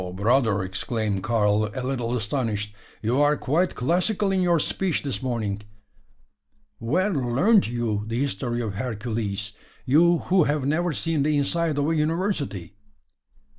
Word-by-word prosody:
brother!" 110 -1 +2
exclaimed 100 +1 -2
Karl, 105 -1 +1
a 130 - -3
little 125 -2 -1
astonished. 105 -2 -2 0.3
"You 120 +6 +2
are 145 0 +3
quite 165 +7 0
classical 185 - +1
in 190 -1 +1
your 175 -1 +3
speech 180 +3 -1
this 140 -2 -3
morning. 110 -6 -2 1.2
Where 185 - +1
learnt 150 - +3
you 115 -3 -2
the 115 +1 -2
history 120 -2 -2
of 110 -4 -3
Hercules 110 -2 -3 0.3
you 170 +6 +5
who 180 -1 +2
have 145 -2 0
never 165 +5 +1
seen 160 -1 -1
the 150 +1 +2
inside 155 +2 0
of 145 0 +1
a 165 - +1
university?" 150 - -1
130 Hz, 140 wpm, -24 LUFS, 110-160 Hz, 1.2 s, you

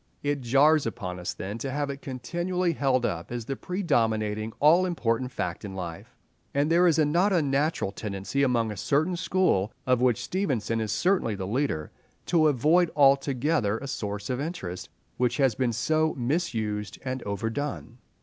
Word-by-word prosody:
It 145 -1 -1
jars 140 +4 +4
upon 90 -5 -5
us 90 - -4
then 100 +4 -5
to 135 - -3
have 140 +1 -2
it 140 0 -8
continually 175 +7 -2
held 130 -4 +1
up 85 0 -3
as 120 -2 -4
the 135 - -3
predominating, 110 - 0
all 170 +5 +5
important 125 -7 -1
fact 90 -6 -4
in 100 -2 -6
life; 85 -3 -7 0.4
and 145 +3 +2
there 175 +2 +5
is 165 -2 +3
a 155 - +4
not 175 +7 +2
unnatural 145 - +1
tendency 100 +5 -3
among 120 -5 +2
a 105 - -7
certain 155 - +1
school, 170 - +1
of 125 -2 +2
which 125 -3 +2
Stevenson 130 - -1
is 110 - -2
certainly 180 - +1
the 95 -1 -4
leader, 105 - -1 0.3
to 160 -3 +3
avoid 155 +6 +3
altogether 135 -4 +3
a 140 - -7
source 105 -3 -4
of 125 +1 -2
interest 95 - -5 0.3
which 125 0 +1
has 135 -4 +3
been 125 +1 0
so 155 +7 +1
misused 115 - -2
and 130 0 -3
overdone. 115 +4 -4
130 Hz, 170 wpm, -27 LUFS, 110-155 Hz, 0.4 s, all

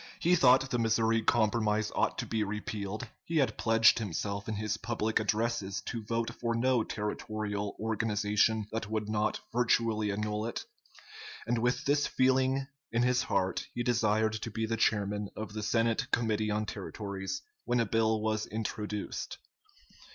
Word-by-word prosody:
He 175 - +3
thought 135 -3 +5
the 120 - +1
Missouri 115 0 +2
Compromise 110 -1 +2
ought - - +1
to - - -2
be 110 -1 0
repealed; 105 +2 -4 0.2
he 165 - -2
had 135 -4 +2
pledged 115 0 +5
himself 100 0 -3
in 110 - -1
his 110 +1 -2
public 110 -1 0
addresses 110 -3 0
to 115 - -4
vote 115 +1 -1
for 115 -1 -2
no 125 0 +2
territorial 105 -1 -3
organization 110 0 +1
that 110 -1 -3
would 110 -1 -2
not 105 0 0
virtually 115 -3 +2
annul 105 +1 -2
it; 115 - -5 0.8
and 120 - 0
with 125 +6 0
this 145 0 +2
feeling 130 +1 +2 0.3
in 115 +1 +2
his 125 0 +3
heart 95 0 -1
he 120 - -1
desired 110 -2 +2
to 110 +1 -4
be 110 +1 -2
the 115 +1 -1
chairman 105 -2 +1
of 110 -1 -6
the 110 - -4
Senate 115 +1 +1
Committee 110 -2 +1
on 105 +1 0
Territories 100 - -5 0.2
when 120 - +1
a 115 - +3
bill 110 0 +2
was 110 0 0
introduced. 105 -1 -4
110 Hz, 160 wpm, -31 LUFS, 105-115 Hz, 0.8 s, thought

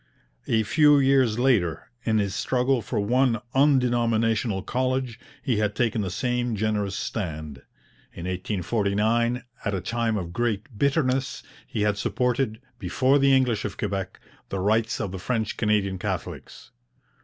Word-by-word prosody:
A 110 -1 +2
few 150 +5 +5
years 135 -5 +3
later, 120 - +1
in 110 -1 +2
his 100 -2 0
struggle 125 +4 +1
for 110 +1 -3
one 120 +3 +2
undenominational 120 -6 +2
college, 130 -1 -1 0.2
he 125 -6 +1
had 105 -1 0
taken 115 -1 +1
the 95 - -2
same 120 +4 -1
generous 105 -2 -1
stand. 80 - -4 0.5
In 85 - -8
1849, 105 +5 0 0.2
at 100 - -1
a - - -1
time 115 +3 -1
of 85 -3 -5
great 115 +2 -2
bitterness, 135 -1 0 0.2
he 105 - -2
had 105 -1 +1
supported, 125 -2 0 0.2
before 135 +3 +2
the 140 0 +4
English 125 -5 +2
of 105 - -5
Quebec, 100 -3 -3 0.3
the 100 - -3
rights 110 +4 +1
of 100 -4 -3
the 95 - -6
French 110 +1 -2
Canadian 105 -3 0
Catholics. 95 - -6
110 Hz, 145 wpm, -25 LUFS, 100-125 Hz, 0.5 s, few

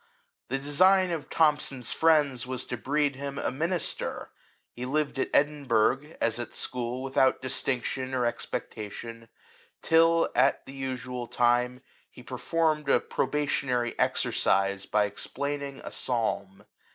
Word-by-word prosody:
The 135 - -1
design 185 +7 +4
of 160 -3 -4
Thomson's 145 -6 +1
friends 145 -6 +3
was 130 -1 -3
to - - -4
breed 140 +3 0
him 140 0 -5
a - - -1
minister. 165 +6 -2 0.4
He 120 - -7
lived 140 +1 -1
at - - 0
Edin 145 0 +2
burgh, 130 +6 +1
as 115 0 0
at 120 - -6
school, 125 +1 -3
without 130 0 +2
distinction 130 0 -2
or 125 -1 +1
expectation, 115 0 -5 0.5
till, 165 +1 +4
at 135 +2 +3
the 135 - -10
usual 130 -2 -4
time, 125 +1 +2 0.3
he 125 - -14
per 125 +1 -6
formed 155 -3 +1
a - - +5
probationary 130 -4 -1
exercise 100 0 +1
by 105 -1 +3
explain 140 +8 -3
ing 140 -1 -7
a - - -7
psalm. 110 -5 -2
130 Hz, 140 wpm, -28 LUFS, 120-145 Hz, 0.5 s, a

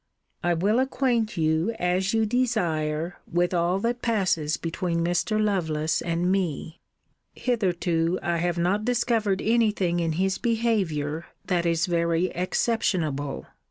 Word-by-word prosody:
I 175 0 +2
will 205 +8 +2
acquaint 245 -5 0
you, 160 +7 +1
as 180 +1 +1
you 225 -1 +2
desire, 175 -9 -1
with 175 +1 +1
all 175 +1 +2
that 240 +2 -1
passes 185 -9 +1
between 170 0 -2
Mr. 190 +5 0
Lovelace 160 -7 0
and 170 +2 0
me. 170 -4 -2 0.5
Hitherto 180 -7 0
I 170 0 0
have 175 +1 -1
not 185 +5 +1
discovered 230 -4 +1
any 230 0 +3
thing 175 -4 0
in 165 -2 0
his 190 +3 0
behaviour 190 - 0 0.2
that 175 -3 0
is 165 +1 +2
very 170 0 +1
exceptionable. 175 - -1
180 Hz, 130 wpm, -25 LUFS, 165-215 Hz, 0.5 s, any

